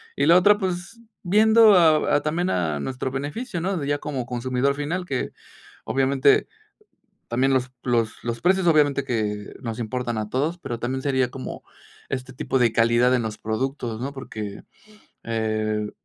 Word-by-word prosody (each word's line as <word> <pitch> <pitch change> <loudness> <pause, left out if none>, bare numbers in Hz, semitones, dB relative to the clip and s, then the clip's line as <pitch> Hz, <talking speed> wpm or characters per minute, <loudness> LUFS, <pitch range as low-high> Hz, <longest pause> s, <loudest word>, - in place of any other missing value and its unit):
y 140 - +1
la 165 +3 +6
otra, 205 +3 +5
pues, 190 +3 -4 0.2
viendo 220 +3 +6
a 160 -4 +4
a 145 - +2
también 170 +4 0
a 80 -5 -1
nuestro 130 - -3
beneficio, 165 - -4
¿no?, 190 +2 -1
de 145 -4 -3
ya 145 0 0
como 135 -5 -4
consumidor 125 +2 0
final 155 +6 -3
que, 135 -7 -3 0.5
obviamente, 135 +1 +3 0.8
también 130 +3 +2
los 130 -1 0
los 115 -3 -1
los 115 -1 -4
precios, 190 +1 +2
obviamente, 145 -3 +3
que 105 -5 -3
nos 115 -2 -5
importan 120 0 -3
a 105 - -3
todos, 150 +8 -1
pero 120 -8 -5
también 130 +3 -2
sería 130 -3 +1
como 130 - -7 0.5
este 130 0 -4
tipo 130 - -1
de 120 -3 +3
calidad 120 +2 +3
en 125 - +1
los 110 -1 -4
productos, 120 0 -3
¿no?, 135 +2 -3
porque, 110 -6 -7 0.6
eh 110 -2 -1
130 Hz, 165 wpm, -24 LUFS, 115-155 Hz, 0.8 s, la